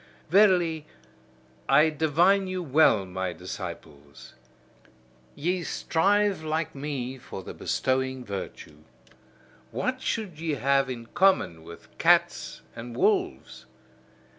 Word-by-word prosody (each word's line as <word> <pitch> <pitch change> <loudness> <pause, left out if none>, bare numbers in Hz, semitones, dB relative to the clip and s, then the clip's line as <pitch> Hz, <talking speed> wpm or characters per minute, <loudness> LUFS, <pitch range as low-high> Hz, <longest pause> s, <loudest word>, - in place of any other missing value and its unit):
Verily, 175 -6 +4 0.8
I 155 +1 +5
divine 170 +6 +3
you 185 -1 -3
well, 135 - +4
my 95 -1 -4
disciples: 85 -6 -9 1.0
ye 180 +4 -1
strive 200 +3 +1
like 155 0 -2
me 135 -2 -5
for 95 -5 -8
the - - -8
bestowing 130 -1 -1
virtue. 95 -6 -7 0.9
What 255 - -2
should 200 -12 -3
ye 160 -2 -1
have 135 0 +2
in 120 -2 -6
common 175 - +2
with 85 +1 -13
cats - - +2
and 120 +1 -8
wolves? - - 0
145 Hz, 105 wpm, -27 LUFS, 115-175 Hz, 1.0 s, I